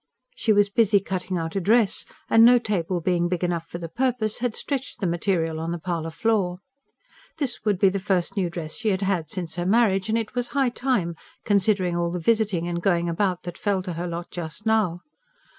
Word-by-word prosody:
She 225 - +1
was 205 -1 +4
busy 215 -2 +4
cutting 185 -1 -3
out 165 +1 -4
a 195 - 0
dress, 215 +2 +2 0.2
and 225 - +6
no 245 +1 +8
table 185 -6 -1
being 175 0 +1
big 180 -1 -2
enough 170 -2 -1
for - - -6
the 170 -1 -6
purpose, 235 +2 -1
had 245 -2 -1
stretched 275 -3 -3
the 200 - -1
material 170 -2 0
on 165 +1 -3
the 170 - -2
parlour 165 -1 -3
floor. 190 -1 0 0.8
This 275 -6 -2
would 205 -3 +2
be 195 +1 +5
the 195 +1 -2
first 185 -2 0
new 185 -4 0
dress 165 -2 -6
she 220 -1 -1
had 195 0 0
had 180 -6 0
since 175 -3 -5
her 175 - -1
marriage; 205 -2 +3
and 220 - +2
it 225 -2 -3
was 245 -1 -2
high 270 -2 +3
time, 240 -9 -1 0.3
considering 195 -3 +2
all 170 0 0
the 175 - -3
visiting 200 -2 +1
and 170 0 -2
going 170 -2 +1
about 180 +1 0
that 175 -1 -7
fell 195 -2 0
to 180 -2 -4
her 170 +2 -4
lot 170 0 -6
just 170 +4 -7
now. 210 -6 +1
185 Hz, 215 wpm, -24 LUFS, 170-215 Hz, 0.8 s, no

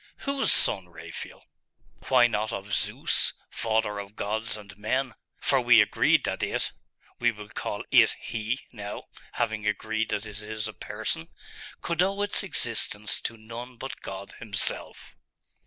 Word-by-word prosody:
'Whose 275 -1 +2
son, 90 -2 +5
Raphael?' 85 - -8 0.6
'Why 125 -2 +7
not 110 -2 0
of 100 +1 -5
"Zeus, - - +2 0.2
father 110 -2 0
of 100 +1 -8
gods 110 +2 -1
and 100 -2 -11
men"? 125 +5 0 0.3
For - - +3
we - - +7
agreed - - +4
that - - -1
it - - 0 0.5
we 120 0 +4
will 105 -2 -10
call - - -3
it - - +7
he, 115 +4 -2
now, 105 -3 -6 0.3
having 105 -1 -1
agreed 110 +2 0
that 105 - -1
it 105 -1 -8
is 110 0 -3
a 110 - -6
person 80 - -3 0.6
could 170 0 +1
owe 195 +2 +2
its 205 - +2
existence 115 - 0
to 115 - -4
none 115 +3 -8
but 135 - -6
God 95 +1 -6
Himself. 110 -2 -3
110 Hz, 150 wpm, -28 LUFS, 105-120 Hz, 0.6 s, Why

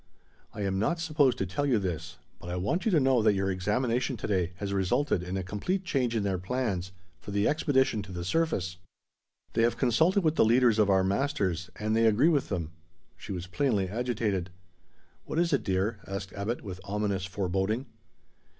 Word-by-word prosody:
"I 105 - -7
am 95 -1 0
not 170 - 0
supposed 150 -5 +2
to 95 - -1
tell 120 +11 -1
you 125 -4 +3
this, 85 -3 -4 0.2
but 85 - -9
I 90 - -2
want 100 - -1
you 220 - +3
to 165 - +5
know 130 -3 +3
that 105 -2 +4
your 95 0 0
examination 120 +7 0
to - - -5
day 90 -4 0
has 100 0 -4
resulted 95 +3 +1
in 90 +2 -4
a 95 - -2
complete 105 - -2
change 125 -8 0
in 110 - +1
their 95 -2 -1
plans 95 -3 -2 0.3
for - - -11
the 100 +1 +1
expedition 130 -7 +2
to 100 -2 -10
the 90 -1 -5
surface. 95 - 0 0.8
They - - +2
have 115 +1 +2
consulted 160 - +3
with 160 -1 +1
the - - +6
leaders 115 -1 +4
of 105 -2 +4
our 95 -1 +4
masters, 95 - 0
and 110 +1 -1
they 115 0 +4
agree 115 +9 +4
with 145 -5 +1
them." 85 -5 -3 0.4
She - - -9
was 90 -2 -4
plainly 100 -2 0
agitated. 110 -5 -1 0.8
"What - - -4
is 170 -1 +2
it, 140 - +3
dear?" 100 +3 0
asked 100 0 -5
Abbot, 105 +4 -3
with 95 -3 -7
ominous 100 -1 -1
foreboding. 95 +5 -1
105 Hz, 195 wpm, -29 LUFS, 95-130 Hz, 0.8 s, the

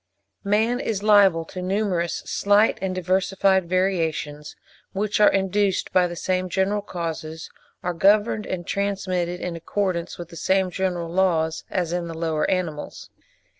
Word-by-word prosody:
Man 220 +5 +1
is 210 -5 -2
liable 200 -6 +5
to 185 - -7
numerous, 185 -2 -1
slight, 205 +2 +3
and 190 -1 -2
diversified 190 0 +1
variations, 165 -5 -1 0.4
which 210 +2 -1
are 210 - +6
induced 195 0 0
by 180 -1 +4
the 175 - -7
same 185 +1 -1
general 195 +3 0
causes, 160 -4 -6 0.3
are 180 - -1
governed 205 +4 +3
and 175 -2 -4
transmitted 185 -3 -2
in 175 -1 -4
accordance 180 0 -2
with 175 -1 -8
the 170 - -12
same 190 +2 +1
general 180 -2 -2
laws, 165 -3 +1
as 175 -3 -1
in 175 -1 -2
the 165 -1 -7
lower 160 -2 0
animals. 170 -5 -3
185 Hz, 145 wpm, -23 LUFS, 170-195 Hz, 0.4 s, are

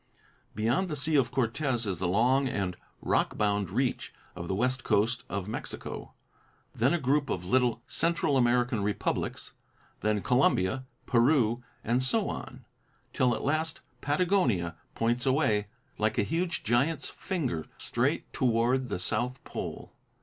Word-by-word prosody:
Beyond 120 - +1
the 150 - -2
Sea 150 +2 -1
of 130 -4 +4
Cortez 125 0 0
is 95 -5 -2
the 95 - 0
long 125 +8 +3
and 95 -5 -2 0.3
rock - - +1
bound 100 -3 +1
reach - - -1 0.2
of 85 - -6
the 95 - -1
west 130 +5 0
coast 115 +4 +1
of 100 +1 -3
Mexico. 110 - -6 0.6
Then 125 +5 +2
a 175 - +3
group 140 +1 +1
of 90 -1 -2
little 120 +2 +2
Central 165 -3 +1
American 120 -2 +2
republics; 100 +1 -2 0.5
then 105 -2 0
Colombia, 125 -1 +2 0.2
Peru 120 -2 +3 0.2
and 120 +3 +1
so 200 +11 +1
on, - - -7 0.5
till 125 -2 +3
at - - -5
last 155 +3 -1 0.2
Patagonia 145 - +1 0.2
points 120 +3 0
away 115 -7 +2 0.3
like 110 +1 +1
a - - +3
huge 170 - -1
giant's 140 +7 +1
finger 130 - -3
straight - - -1
toward 125 +1 +2
the 100 - -1
South 120 +8 -1
Pole. - - -6
120 Hz, 140 wpm, -29 LUFS, 105-140 Hz, 0.6 s, of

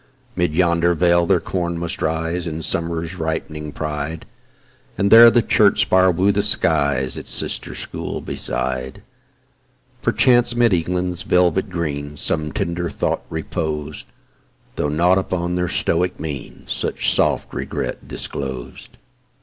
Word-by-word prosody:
'Mid 85 -3 0
yonder 85 0 +2
vale 85 0 +3
their 95 -3 +3
corn 85 -2 -3
must 85 0 -4
rise 80 +2 -1
In 80 0 -4
Summer's 85 +2 -3
ripening 80 -1 -4
pride, 75 +1 -4 0.7
And 100 0 +1
there 115 +1 +10
the 120 0 +3
church 100 -2 +3
spire 95 0 +4
woo 90 +3 +2
the 100 +1 +1
skies 70 -10 +2
Its - - -6
sister - - 0
school - - -5
beside. 65 0 -2 1.0
Perchance 120 -1 +3
'mid 120 -3 +3
England's 90 +1 -1
velvet 90 +2 +2
green 75 -4 -4
Some 75 +1 -2
tender 85 0 -2
thought - - -2
repos'd, 80 -2 -4 0.7
Though 75 - -1
nought 90 +5 +3
upon 90 -2 -2
their 90 0 -1
stoic 90 +3 0
mien 75 -5 -7
Such - - -1
soft - - 0
regret - - -4
disclos'd. 65 -3 -6
85 Hz, 130 wpm, -20 LUFS, 75-90 Hz, 1.0 s, there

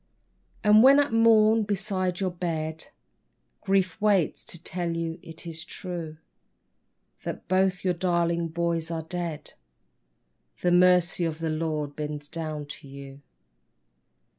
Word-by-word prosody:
And 210 0 +7
when 275 +3 +7
at 285 -5 +1
morn 225 -1 +5
beside 195 -3 -1
your 185 -1 0
bed 160 -3 -4 0.8
Grief 195 0 +1
waits 200 -6 +2
to - - -6
tell 170 0 -3
you 165 +1 -3
it 165 +1 -9
is 165 -1 -6
true, 170 -3 -6 1.0
That - - -6
both 185 0 +1
your 185 -1 +2
darling 170 -1 0
boys 165 0 -2
are 165 -1 -3
dead; 170 -2 -5 1.1
The 175 - +2
Mercy 180 -1 +4
of 160 -2 -1
the 165 -1 -2
Lord 155 -2 -2
bends 150 -1 -5
down 155 -2 -4
to 145 0 -10
you. 135 0 -11
170 Hz, 130 wpm, -26 LUFS, 160-185 Hz, 1.1 s, And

